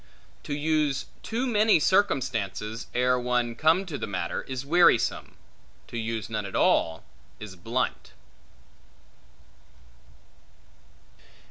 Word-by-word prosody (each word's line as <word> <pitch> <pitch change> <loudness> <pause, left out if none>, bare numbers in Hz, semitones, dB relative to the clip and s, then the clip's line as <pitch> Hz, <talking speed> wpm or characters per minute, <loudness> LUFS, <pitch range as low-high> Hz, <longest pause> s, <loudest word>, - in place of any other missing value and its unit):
To 145 - -3
use 150 -2 0 0.2
too 235 +3 -2
many 215 -5 +4
circumstances, 115 - 0
ere 125 0 +2
one 125 -1 0
come 160 +9 +2
to 155 -6 -6
the - - -4
matter, 90 -4 -3
is 130 0 -6
wearisome; 170 -5 +3 0.5
to - - -11
use 115 -1 -3
none 110 -2 -3
at 95 - -8
all, 80 0 +2 0.4
is 105 -3 -9
blunt. 115 +8 -3
125 Hz, 105 wpm, -26 LUFS, 110-155 Hz, 0.5 s, many